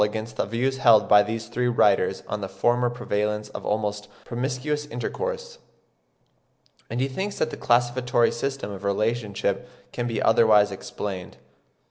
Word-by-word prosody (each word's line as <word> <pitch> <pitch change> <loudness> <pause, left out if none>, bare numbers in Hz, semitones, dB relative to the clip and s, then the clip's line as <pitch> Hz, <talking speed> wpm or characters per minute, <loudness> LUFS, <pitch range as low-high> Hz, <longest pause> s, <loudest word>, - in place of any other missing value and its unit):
197) 105 +1 +1
against 110 0 -7
the 115 - -2
views 130 +2 +1
held 115 -4 +5
by 105 0 +7
these 110 +2 -3
three 125 +2 -1
writers 120 - +2
on 105 - -3
the 95 - -4
former 120 +6 +1
prevalence 105 -3 -2
of - - -8
almost 105 -1 -2 0.2
promiscuous 135 +4 -2
intercourse; 480 - -4 1.3
and 120 - -3
he 130 - +1
thinks 190 +9 -4
that 155 - 0
the - - -5
classificatory 120 0 +2
system 135 -3 -3
of 100 0 -8
relationship 105 +1 -1 0.2
can 120 -1 -3
be 115 -2 -2
otherwise 110 -2 +5
explained.) 95 -1 -6
115 Hz, 150 wpm, -25 LUFS, 105-125 Hz, 1.3 s, by